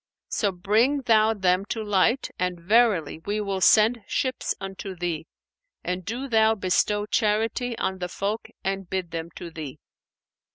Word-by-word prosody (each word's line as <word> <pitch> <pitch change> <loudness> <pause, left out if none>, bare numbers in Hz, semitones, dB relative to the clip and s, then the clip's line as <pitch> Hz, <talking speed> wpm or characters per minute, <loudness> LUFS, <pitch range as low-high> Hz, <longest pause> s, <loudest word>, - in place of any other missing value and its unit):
So 205 -3 0
bring 220 +10 +2
thou 220 -2 +4
them 185 -1 +2
to 220 +1 -3
light; 210 +5 +1
and 180 -1 -1
verily, 195 -5 +2
we 205 +3 -2
will 195 -2 -2
send 220 +4 +5
ships 260 -1 -1
unto 195 0 -6
thee; 170 -3 -3 0.6
and 180 +1 -3
do 240 +8 -4
thou 220 -2 +4
bestow 205 +1 +1
charity 225 +3 0
on 190 0 -2
the 180 0 -3
folk 205 +4 -3 0.2
and 195 -1 -3
bid 185 -3 -3
them 165 0 -4
to 170 - -8
thee." 155 -5 -7
200 Hz, 155 wpm, -25 LUFS, 180-220 Hz, 0.6 s, send